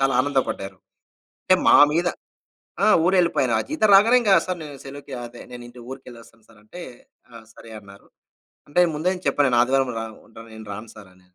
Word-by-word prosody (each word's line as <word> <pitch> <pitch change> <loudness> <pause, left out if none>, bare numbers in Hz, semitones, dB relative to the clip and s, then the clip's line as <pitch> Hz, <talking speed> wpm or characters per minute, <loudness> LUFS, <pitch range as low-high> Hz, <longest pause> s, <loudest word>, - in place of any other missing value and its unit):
చాలా 135 0 +1
ఆనందపడ్డారు. 130 -9 -3 0.7
అంటే - - +4
మా - - +7 0.2
మీద 170 +2 0 0.8
ఆ! - - +3 0.2
ఊరెళ్ళిపోయాను. 175 -9 +1
ఆ - - 0
జీతం 300 -8 +1
రాగానే 225 +5 +5
ఇంక 210 -4 +1 0.2
సార్ 180 -2 -4 0.2
సెలవుకి 140 0 -11
అదే 120 0 -13
నేను 120 -1 -9
ఇంటి 120 +1 -15
ఊరికెళ్లొస్తాను 120 -4 -13
సార్ 110 -2 -21
అంటే, 175 +12 -12 0.5
ఆ - - -15 0.2
సరే 115 - -15
అన్నారు. 100 -1 -17 0.6
అంటే 145 +5 +1
ముందే 160 +5 -1 0.2
చెప్పాను 145 - +2
నేను 120 -2 +1
ఆదివారం 130 +1 0
రాను. 110 -1 -7
ఉంటా 115 - -13
నేను 110 0 -11
రాను 110 +2 -10
సార్ 100 -3 -14
అని. 90 0 -28
130 Hz, 175 wpm, -22 LUFS, 110-155 Hz, 0.8 s, మా